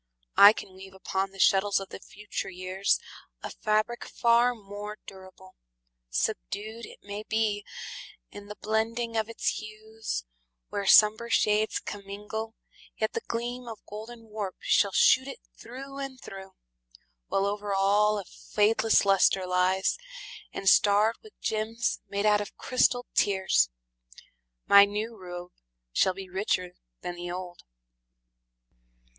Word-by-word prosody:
I 200 - +11
can 195 -3 -8
weave 190 0 -12
Upon 190 0 -2
the 195 - -16
shuttles 195 +1 +4
of 195 - -8
the - - -8
future 210 -1 -6
years 185 +1 0 0.4
A - - -5
fabric 215 +3 0
far 235 +1 +3
more 205 0 -8
durable. 190 -1 -13 0.6
Subdued, 210 - -3
It - - -15
may 205 +1 -6
be, 215 -1 -1 0.7
in 205 0 -10
the 210 - -8
blending 230 +2 -1
of 220 0 0
its 230 - -1
hues, 215 - -6 0.4
Where 200 -1 -3
somber 220 +3 +6
shades 215 -1 +2
commingle, 210 +3 -6 0.4
yet 220 - -1
the - - -2
gleam 240 +1 -4
Of 225 -3 -9
golden 225 +3 -9
warp 205 -3 -4
shall 200 - +3
shoot 260 +7 +5
it 275 - -7 0.2
through 275 +3 -9
and 270 -2 -6
through, 190 -3 -10 0.7
While 195 - +1
over 205 0 -2
all 205 +2 +3
a 200 - -5
fadeless 220 +3 +2
luster 195 -1 +4
lies, 185 - +1 0.5
And 195 - -6
starred 210 +3 +5
with 435 -1 -17
gems 220 +2 -1
made 200 +1 -1
out 210 -1 +4
of 205 - -8
crystalled 250 -1 +2
tears, 190 - +3 1.0
My 200 0 +9
new 210 +3 -2
robe 180 -2 -8 0.4
shall 185 - +2
be 195 0 -8
richer 185 -1 -1 0.3
than 175 - -4
the 175 0 -7
old. 180 -1 -6
205 Hz, 135 wpm, -28 LUFS, 195-220 Hz, 1.0 s, I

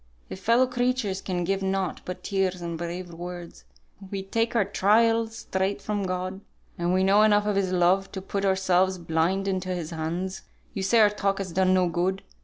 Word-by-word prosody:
If - - -6
fellow 230 +6 +4
creatures 245 -6 -1
can 180 -2 -2
give 195 +2 -1
nought 190 -1 -1
but 180 0 -6
tears 190 -2 0
and 170 -1 -4
brave 175 +1 -5
words, 175 - -8 0.4
we 195 -1 -4
take 230 +4 -1
our 215 -4 +3
trials 225 +3 +2
straight 190 +2 -2
from 205 -1 -2
God, 185 +1 -3 0.3
and 175 0 -1
we 185 +1 +2
know 200 +2 +5
enough 210 -1 +4
of 210 -1 0
His 195 -2 0
love 185 +2 +2
to 195 - -4
put 200 0 -3
ourselves 190 -1 +2
blind 170 +3 0
into 185 -1 -2
His 175 -3 -3
hands. 170 +4 -3 0.3
You 195 - -3
say 225 +4 +4
our 210 -1 +6
talk 200 -1 0
has 195 -3 -4
done 185 +1 +3
no 185 -1 +3
good. 180 +3 -1
190 Hz, 195 wpm, -26 LUFS, 180-200 Hz, 0.4 s, our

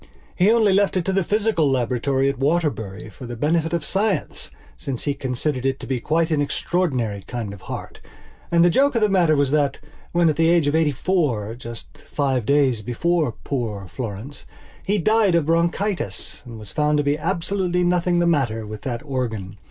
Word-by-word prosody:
He 190 +3 +4
only 220 -4 +4
left 200 -1 +2
it 175 - -1
to 195 - 0
the 195 -1 +2
physical 205 -6 +1
laboratory 130 +1 +1
at 140 -2 -1
Waterbury 140 - -1
for 120 +6 -10
the 120 - -5
benefit 160 +6 +1
of 170 -3 -1
science, 195 -4 -1 0.3
since 125 - -5
he 145 - 0
considered 130 0 -2
it 135 0 0
to - - -7
be 130 -2 -2
quite 160 +5 0
an 150 -2 +2
extraordinary 130 - -1
kind 115 -5 -4
of 100 - -11
heart. - - -7 0.5
And 170 0 +4
the 175 - +4
joke 280 +6 +3
of 230 - +2
the 210 - +4
matter 175 -5 +3
was 140 -2 +1
that, 145 -2 +1 0.3
when, 170 -1 +3
at 155 - +1
the 165 0 +4
age 170 -3 +4
of 145 - +1
eighty 160 -2 +3
four, 130 - 0
just 115 -1 -10
five 135 -6 -1
days 140 -5 +3
before 150 +4 0
poor 110 -8 -3
Florence, 115 +6 -6 0.4
he 205 +2 +1
died 210 0 +3
of 165 -3 +2
bronchitis 170 +5 -1
there 115 - -8
was 105 -3 -9
found 150 0 +1
to 145 - +2
be 145 0 +2
absolutely 180 +2 0
nothing 175 0 +2
the 175 - +3
matter 125 -10 +1
with 105 0 -8
that 120 0 -4
organ. 110 -8 -3
145 Hz, 195 wpm, -22 LUFS, 125-175 Hz, 0.5 s, He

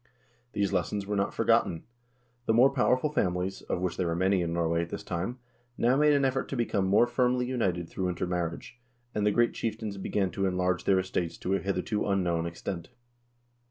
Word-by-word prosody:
These 100 -1 0
lessons 95 +2 -1
were 105 +1 -2
not 100 0 0
forgotten. 80 - +2 0.6
The 110 - +3
more 125 +4 +6
powerful 130 +2 +2
families, 90 -7 -1
of 90 - -3
which 90 -2 -2
there 90 - 0
were 85 - 0
many 95 +1 +2
in 85 -1 -1
Norway 85 0 +1
at 85 - -4
this - - -5
time, 95 +8 -3 0.4
now 120 +2 +3
made 150 +1 +4
an 140 -1 +3
effort 135 0 -1
to - - -3
become 110 -5 0
more 100 +5 +5
firmly 125 0 +1
united 95 -9 -1
through 90 +2 -2
intermarriage, 90 +5 -3 0.3
and 105 0 +1
the - - +4
great 120 +3 +2
chieftains 110 -2 -3
began 95 -1 -1
to 95 0 0
enlarge 90 -1 0
their 95 - +4
estates 90 -2 -2
to 95 - -2
a 95 - +2
hitherto 100 +2 -1
unknown 90 -4 +1
extent. 85 0 -6
95 Hz, 195 wpm, -29 LUFS, 90-120 Hz, 0.6 s, more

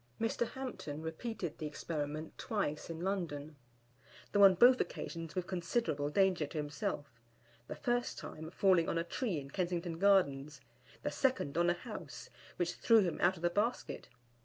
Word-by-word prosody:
Mr. 225 +1 0
Hampton 160 - -5
repeated 170 +1 -4
the 155 - -2
experiment 150 0 -4
twice 180 -10 -2
in 165 0 -5
London, 160 -6 -3 0.8
though 205 -1 +5
on 195 -1 +9
both 250 +7 +7
occasions 165 -2 -5
with 180 -1 -1
considerable 175 -5 -1
danger 185 -2 +2
to 155 - -7
himself, 145 -4 -4 0.5
the - - -5
first 245 -2 -1
time 160 +1 -7
falling 185 -2 +3
on - - 0
a 165 - +1
tree 175 - -2
in 140 0 -10
Kensington 175 -2 -2
Gardens, 150 -7 +3 0.4
the - - -1
second 255 - 0
on 175 +1 +3
a 175 - +2
house, 170 - -8 0.2
which 175 -1 -1
threw 230 -2 +5
him 175 -4 -1
out 185 +2 +4
of 165 - -12
the 175 - +3
basket. 215 +6 -1
175 Hz, 160 wpm, -34 LUFS, 150-200 Hz, 0.8 s, on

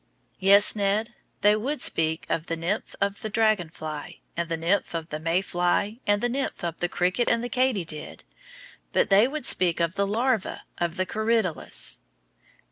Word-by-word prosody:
Yes, 200 +3 +5
Ned, 210 +3 0 0.3
they 210 0 +5
would 270 +8 -2
speak 160 0 +2
of 165 0 -2
the 165 - -2
nymph 175 +6 -3
of 200 0 -1
the 215 - -4
dragon 215 -5 +2
fly, 155 -2 -7 0.2
and 170 0 -2
the 165 - -1
nymph 170 +2 0
of 165 -1 -4
the 150 - -4
May 165 +3 +1
fly 180 +5 0
and 205 +1 +2
the - - +3
nymph 265 -3 -3
of 170 -1 -3
the 175 - 0
cricket 185 +9 +1
and 235 0 +2
the 245 - -3
katydid, 205 -13 -1 0.7
but - - +2
they 205 +5 +6
would 295 -1 -5
speak 175 -2 +2
of 170 0 +1
the 200 0 0
larva 230 +1 0 0.2
of 170 -1 -1
the 185 -1 0
corydalus. 220 -4 0
195 Hz, 180 wpm, -26 LUFS, 170-220 Hz, 0.7 s, they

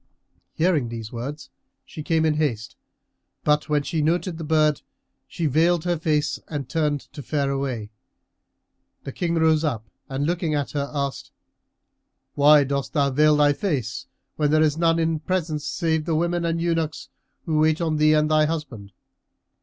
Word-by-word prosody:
Hearing 160 -7 +1
these 115 -2 -7
words 135 +6 -7 0.3
she 155 - -9
came 160 +1 +1
in 155 - +3
haste; 130 -8 -2 0.7
but, 150 +1 +1
when 150 -1 +1
she 160 +2 -2
noted 170 +2 0
the - - -5
bird, 155 -2 +2 0.5
she 170 - -4
veiled 160 +3 +2
her 175 -1 +1
face 155 -2 0
and 145 -5 -5
turned 150 -2 0
to 145 - -7
fare 140 +1 -1
away. 130 -6 -3 1.1
The 135 - -6
King 170 +3 -2
rose 160 -1 +3
up 115 -8 -2 0.2
and 135 +1 -2
looking 170 -2 -1
at 140 -4 -2
her, 140 -1 -2
asked, 140 -2 -3 1.0
"Why 145 0 +6
dost 140 0 -3
thou 140 -3 +2
veil 150 +2 +4
thy 145 -1 +4
face 135 - -3 0.3
when 150 -1 +1
there 155 +1 +4
is 150 -2 +2
none 165 0 +2
in 165 -1 0
presence 155 -3 -2
save 160 -3 -1
the 165 -2 0
women 170 +1 0
and 165 0 0
eunuchs 165 -2 -2 0.4
who 155 -2 0
wait 155 0 +3
on 160 -3 0
thee 155 0 +4
and 150 0 +2
thy 155 0 +4
husband?" 135 - -5
150 Hz, 170 wpm, -23 LUFS, 140-160 Hz, 1.1 s, Why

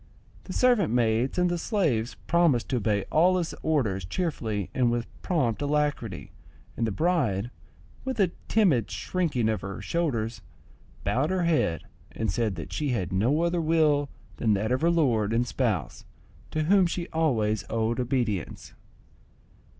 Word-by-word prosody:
The - - -6
servant 245 - +3
maids 120 +3 +1
and 180 0 +3
the 175 -1 -1
slaves 155 - 0
promised 165 -8 +2
to 130 - +1
obey 105 -3 0
all 180 +4 +4
his 170 -3 -2
orders 120 - 0
cheerfully 110 - -3
and 125 -2 +2
with 120 0 -1 0.2
prompt 135 - 0
alacrity 145 - -1 0.4
and 115 - 0
the - - -1
bride, 120 - 0 0.5
with 260 -3 -4
a 185 -4 +3 0.2
timid 165 - +3
shrinking 155 -11 -1
of 110 -1 0
her 100 -1 -6
shoulders, 115 -10 -2 0.6
bowed 125 +9 +1
her 185 -1 0
head, 155 - +1 0.3
and 110 -3 -1
said 110 0 -1
that 85 - -7
she 150 -2 -1
had 95 -8 -2
no 125 - +2
other 170 0 +1
will 155 -3 +2 0.3
than 110 -3 +2
that 105 +3 -1
of 130 - +1
her 165 - +3
lord 120 -11 +2
and 120 +2 +2
spouse, 105 - -2 0.5
to 155 - -1
whom 190 +2 +4
she 170 0 -3
always 115 -10 +1
owed 115 +2 0
obedience. 120 - -2
125 Hz, 155 wpm, -27 LUFS, 110-165 Hz, 0.6 s, all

